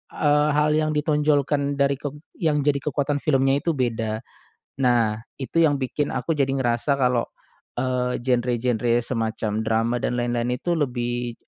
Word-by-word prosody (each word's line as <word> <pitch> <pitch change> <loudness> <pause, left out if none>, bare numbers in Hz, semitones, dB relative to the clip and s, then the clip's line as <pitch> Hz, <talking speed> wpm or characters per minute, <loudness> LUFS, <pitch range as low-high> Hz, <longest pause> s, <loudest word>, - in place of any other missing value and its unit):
eee, 150 0 +3
hal 150 0 +3
yang 155 0 +1
ditonjolkan 145 -1 +1
dari 140 0 +1
kek 145 -1 -5 0.3
yang 150 -3 +1
jadi 145 0 +2
kekuatan 145 0 -1
filmnya 135 -1 +2
itu 165 - +2
beda. 115 -4 -1 0.6
Nah, 120 -4 +2 0.2
itu 150 - -2
yang 150 -3 +4
bikin 140 +2 -2
aku 165 - -1
jadi 135 -1 +1
ngerasa 125 +1 +1
kalau, 125 -3 +1 0.5
eee, 125 -1 -1
genre-genre 120 -1 +1
semacam 115 -2 -2 0.2
drama 115 +2 +1
dan 120 - -2
lain-lain 120 0 -1
itu 150 +8 -4
lebih, 120 -3 -2
130 Hz, 145 wpm, -23 LUFS, 120-145 Hz, 0.6 s, yang